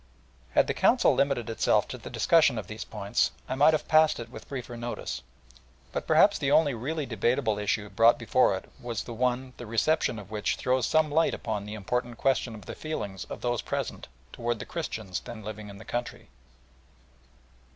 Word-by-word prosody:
Had - - +5
the - - -1
Council - - +4
limited 140 -5 +1
itself 115 - +2
to - - -5
the - - -9
discussion 155 -7 +4
of 110 - -4
these 110 +1 -6
points 105 +1 0 0.2
I - - -2
might 150 +4 +5
have 155 - -4
passed 155 0 +4
it 115 0 -7
with - - -11
briefer 125 -3 -5
notice; 120 - -5 0.7
but - - -4
perhaps - - +5
the 135 - 0
only 145 -1 +4
really 145 +6 -3
debatable 115 -1 0
issue 105 0 -1
brought 115 +4 +5
before 115 -4 +3
it - - -11
was 120 -3 -4
one 125 +2 -1
the 120 - -8
reception 115 +3 +1
of 105 -1 -10
which 105 -1 0
throws 130 -2 +1
some 155 -1 +3
light 160 +2 +3
upon 105 -2 -4
the 105 - -5
important 120 +3 -2
question 130 -4 +1
of 105 - -12
the - - -6
feelings 105 -12 -5
of - - -8
those 120 -2 0
present - - -4 0.3
towards 120 0 -2
the - - -7
Christians 110 - -4
then 115 -2 -9
living 105 0 -7
in 100 - -10
the 110 - -12
country. 120 0 -5
120 Hz, 190 wpm, -28 LUFS, 110-135 Hz, 0.7 s, Had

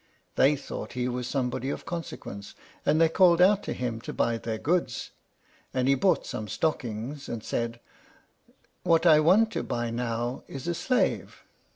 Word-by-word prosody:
They 140 +3 +5
thought 140 - -7
he 125 0 -1
was 125 0 -3
somebody 130 -1 -2
of - - -5
consequence, 100 - -7 0.3
and 155 +2 +4
they 165 - +6
called 170 +1 +5
out 195 +3 +5
to - - -3
him 120 -3 -3
to - - -6
buy 115 -1 0
their 115 -1 -3
goods. 150 -3 -1 0.6
And 130 0 +1
he 135 - +5
bought 180 +8 +2
some 110 - -5
stockings, 130 - -3
and 115 -2 -5
said, 115 0 -2 1.0
"What 165 0 +3
I 155 -3 +7
want 195 +8 +4
to - - -2
buy 120 -1 -2
now 120 +1 -2
is 135 +4 -7
a 170 - +1
slave." 250 +9 -1
130 Hz, 170 wpm, -27 LUFS, 115-165 Hz, 1.0 s, I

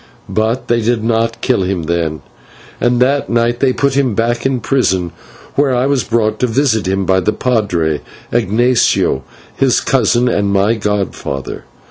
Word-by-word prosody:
But 110 +5 -1
they 120 0 +1
did 115 0 0
not 115 +1 0
kill 125 -6 +1
him 90 -2 -1
then, 80 -1 -2 0.6
and 120 +1 +1
that 140 +2 0
night 120 0 +1
they 135 -2 +3
put 140 +1 0
him 135 -5 +1
back 120 +2 0
in 135 -1 0
a - - -5
prison, 95 -9 0 0.4
where 140 -2 +2
I 125 +1 +1
was 140 -2 +1
brought 110 -2 0
to 125 - +1
visit 115 -4 +1
him 95 0 0
by 95 0 +3
the 100 - +1
/padre/, 90 - 0 0.3
Ignatio, 120 - +2 0.3
his - - +2
cousin 120 +1 +2
and 100 -4 +1
my 100 +3 +2
godfather. 100 - -3
115 Hz, 165 wpm, -15 LUFS, 100-125 Hz, 0.6 s, they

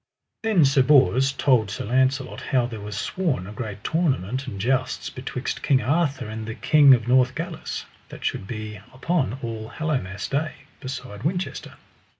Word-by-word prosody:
Then 215 -9 +4
Sir 135 0 +4
Bors 135 -1 +5
told 125 -6 +2
Sir 100 - -4
Launcelot 130 +3 +1
how 130 -4 +1
there 115 -3 -6
was 105 0 -6
sworn 145 - -1
a 100 - -8
great 105 -2 -6
tournament 135 - 0
and 100 -6 -6
jousts 130 +4 0
betwixt 130 0 -4
King 135 -2 +3
Arthur 140 0 +1
and 110 0 -6
the 115 - -5
King 145 -3 +6
of 115 -1 -4
Northgalis, 130 +7 0 0.2
that - - -9
should 95 - -2
be 110 -1 -6 0.2
upon 135 - 0
All 110 -1 -5
Hallowmass 130 -12 -2
Day, 155 +3 -1 0.3
beside 130 -7 -7
Winchester. 180 +7 -3
130 Hz, 155 wpm, -24 LUFS, 110-140 Hz, 0.3 s, King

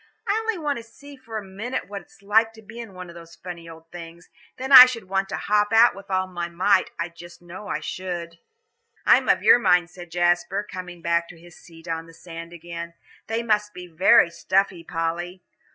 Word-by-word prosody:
I 405 - +2
only 445 -2 -2
want 295 -4 -2
to 230 - -8
see 280 +5 -15
for 230 -4 -8
a 215 - -5
minute 200 +4 -5
what 200 0 -7
it's 195 +3 -23
like 220 +3 +3
to 220 0 -16
be 220 +3 -11
in 225 -5 -9
one 180 0 -8
of - - -11
those 170 -1 -13
funny 170 -2 -9
old 165 0 -14
things. 170 0 -11 0.3
Then 265 +2 -5
I 255 -1 +12
should 230 -6 -6
want 195 0 -1
to - - -3
hop 210 0 +1
out 230 +2 +6
with 195 0 -13
all 185 -1 0
my 175 -2 -5
might, 185 +3 +2
I 170 - -2
just 170 +1 -14
know 175 +4 -11
I 155 - -3
should." 170 0 -6 0.7
"I'm - - +4
of - - +3
your 245 - +7
mind," 180 -4 +2
said 175 -2 -11
Jasper, 175 +3 0
coming 180 -2 -9
back 170 0 0
to 170 - -13
his 175 0 -16
seat 165 0 -16
on 165 -1 -4
the 165 - -16
sand 165 0 -10
again. 170 0 -8 0.3
"They 225 +1 -2
must 210 -2 0
be 180 - -8
very 170 0 +4
stuffy, 185 +1 0
Polly. 175 +2 -4
180 Hz, 215 wpm, -23 LUFS, 170-210 Hz, 0.7 s, I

